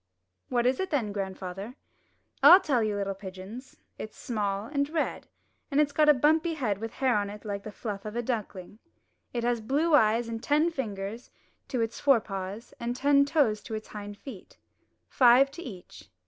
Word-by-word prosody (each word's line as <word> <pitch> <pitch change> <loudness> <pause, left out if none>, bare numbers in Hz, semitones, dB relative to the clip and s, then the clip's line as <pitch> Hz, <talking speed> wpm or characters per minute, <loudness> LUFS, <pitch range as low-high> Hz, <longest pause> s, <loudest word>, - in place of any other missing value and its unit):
"What 240 -1 +1
is 255 +1 +2
it 380 - -2
then, 245 -9 -1
grandfather?" 195 +2 -5 0.7
"I'll 360 - +10
tell 280 -10 +1
you, 215 -2 0
little 200 -1 -2
pigeons. 195 +6 -10 0.2
It's 215 - -8
small 205 -3 -2
and 280 +3 -1
red, 320 0 -2 0.4
and 285 -1 +1
it's 295 -1 +3
got 300 +1 +3
a - - +9
bumpy 315 +5 +2
head 215 -10 -1
with 225 +1 -5
hair 260 -3 +1
on 205 -1 0
it 210 +1 -10
like 200 -1 -3
the 215 - -8
fluff 205 -2 -6
of 215 +1 -7
a 240 - -1
duckling. 210 -4 -5 0.5
It 240 -1 -3
has 240 -1 0
blue 290 +8 +1
eyes, 230 -3 +4
and 225 -1 -5
ten 305 +5 +2
fingers 220 -5 -5 0.4
to 250 -4 -2
its 225 +1 -3
fore 275 -4 +5
paws, 195 +2 -7
and 240 +1 -3
ten 280 +2 +4
toes 280 -9 +2
to 220 - -6
its 215 - -7
hind 205 -1 -8
feet 220 -6 -11 0.3
— - - -47
five 255 +2 +5
to 295 - -9
each." 195 - -11
230 Hz, 190 wpm, -28 LUFS, 205-275 Hz, 0.7 s, I'll